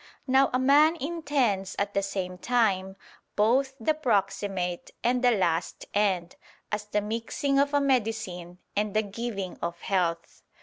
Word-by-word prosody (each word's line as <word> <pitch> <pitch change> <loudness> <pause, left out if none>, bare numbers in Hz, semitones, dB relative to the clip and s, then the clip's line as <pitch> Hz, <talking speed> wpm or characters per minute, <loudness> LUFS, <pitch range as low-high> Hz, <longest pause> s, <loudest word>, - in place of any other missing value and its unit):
Now 265 0 +4
a 255 - +2
man 290 +5 +5
intends 280 - -1
at 200 0 -1
the 200 - +1
same 185 -2 -4
time, 195 -5 +1 0.4
both 260 +6 +2
the 235 +7 +2
proximate 195 - -1
and 250 +1 +1
the 250 - +6
last 175 -7 0
end; 190 -4 0 0.3
as 210 0 -2
the 210 0 -1
mixing 230 +6 -1
of 280 0 +2
a 290 - +3
medicine 220 -9 -1 0.2
and 210 0 -1
the 215 - +3
giving 205 -2 -5
of 170 0 -3
health. 170 -4 -1
210 Hz, 145 wpm, -27 LUFS, 190-255 Hz, 0.4 s, the